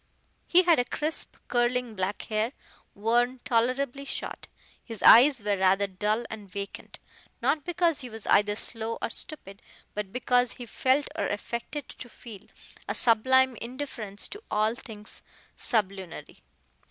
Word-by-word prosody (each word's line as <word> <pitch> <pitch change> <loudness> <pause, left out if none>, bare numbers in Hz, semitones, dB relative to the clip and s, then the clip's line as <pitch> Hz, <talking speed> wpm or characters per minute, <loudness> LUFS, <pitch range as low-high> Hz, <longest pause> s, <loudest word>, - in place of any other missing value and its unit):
He 360 +1 +6
had 320 -9 +3
crisp, 310 +1 -2
curling 245 -1 +1
black 190 0 -2
hair, 220 +3 -1 0.4
worn 240 +4 +2
tolerably 255 +2 +1
short. 280 - -5 0.4
His 225 -3 -8
eyes 255 -1 +8
were 205 -1 +1
rather 190 +1 +3
dull 210 +4 -1
and 210 -3 -9
vacant, 200 +1 -7 0.4
not 300 - +1
because 340 -3 +1
he 250 - -7
was 225 -2 -8
either 205 0 +4
slow 225 +1 -4
or - - -3
stupid, 200 - -5 0.3
but 205 -2 -4
because 250 0 +2
he 245 - -8
felt 265 +5 +1
or - - 0
affected 235 +6 -4
to 250 - -9
feel, 220 -4 -12 0.4
a - - -2
sublime 260 +3 +4
indifference 235 -5 -4
to 415 - -9
all 215 +1 +2
things 215 -3 -9 0.3
sublunary. 195 -6 -2
235 Hz, 140 wpm, -28 LUFS, 210-260 Hz, 0.4 s, eyes